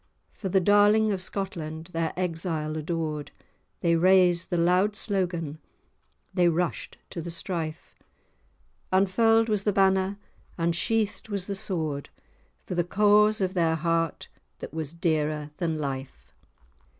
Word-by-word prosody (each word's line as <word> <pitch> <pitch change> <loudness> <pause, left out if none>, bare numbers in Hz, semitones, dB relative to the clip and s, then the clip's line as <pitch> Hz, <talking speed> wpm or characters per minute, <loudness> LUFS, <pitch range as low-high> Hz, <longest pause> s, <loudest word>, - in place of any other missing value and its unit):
For 195 - -5
the 190 +1 +4
darling 205 +3 +4
of 190 -2 -2
Scotland, 165 -4 -5
their 165 -1 0
exile 165 -3 -2
adored, 155 -2 -3 0.5
They 170 -1 +3
raised 180 0 +4
the 175 - 0
loud 180 +5 +3
slogan—they 175 -2 -3
rushed 170 +1 -2
to 170 - -5
the 170 - -6
strife; 165 -2 -4 1.0
Unfurl'd 225 +4 +4
was 210 -3 +1
the 210 - +1
banner, 190 0 +2 0.4
unsheathed 200 +7 0
was 200 -3 -3
the 200 - -3
sword, 160 -7 -3 0.6
For - - -5
the 175 -1 +1
cause 210 +3 +4
of 185 -1 0
their 165 -3 +2
heart, 165 0 -1 0.3
that - - -8
was 155 -3 -4
dearer 155 -3 -1
than 165 -3 -1
life." 135 - -6
175 Hz, 125 wpm, -27 LUFS, 160-195 Hz, 1.0 s, the